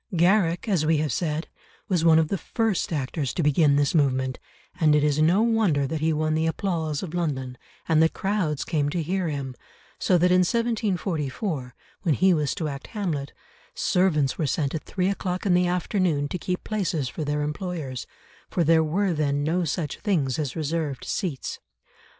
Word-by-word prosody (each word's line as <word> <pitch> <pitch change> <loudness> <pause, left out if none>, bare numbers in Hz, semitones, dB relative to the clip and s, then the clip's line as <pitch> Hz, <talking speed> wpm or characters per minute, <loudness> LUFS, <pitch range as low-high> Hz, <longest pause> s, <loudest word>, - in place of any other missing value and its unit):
Garrick, 175 +1 +3
as 185 -7 +2
we 155 0 +3
have 150 -4 0
said, 155 0 -2 0.4
was 180 -4 +1
one 165 -1 +6
of 160 -1 +2
the 195 - 0
first 225 0 -1
actors 140 -2 -2
to 170 - 0
begin 150 0 +4
this 145 -1 +2
movement, 130 -4 +1 0.4
and 155 -3 +4
it 150 - +3
is 150 0 +2
no 175 +7 +4
wonder 215 -12 +2
that 150 +3 -3
he 160 +1 +2
won 155 0 0
the 160 +1 +1
applause 160 -3 -2
of 175 -3 -6
London, 135 -7 -2 0.3
and 160 -1 +4
that 160 - +4
crowds 190 -7 -1
came 145 -3 0
to 165 +2 -2
hear 185 +2 -1
him, 140 -3 -4 0.5
so 180 - +3
that 180 +1 +3
in 180 - +5
1744, 180 - -1 0.3
when 160 -5 +1
he 185 +4 +4
was 150 -4 0
to 160 - -2
act 140 -1 -6
Hamlet, 165 -10 -3 0.4
servants 180 - +1
were 155 - +1
sent 140 0 -1
at 160 - -4
three 185 -2 -1
o'clock 185 -1 -2
in 190 - +3
the 180 0 +3
afternoon 175 -4 0
to 180 - -3
keep 180 +1 -3
places 175 - -1
for 140 +6 -5
their 150 0 -1
employers, 150 -4 -4 0.4
for 175 - +1
there 160 0 +4
were 180 +4 0
then 145 -2 0
no 170 +4 +1
such 155 -1 -3
things 155 - 0
as 145 -5 -2
reserved 155 -3 -2
seats. 165 - -3
160 Hz, 185 wpm, -25 LUFS, 145-180 Hz, 0.5 s, one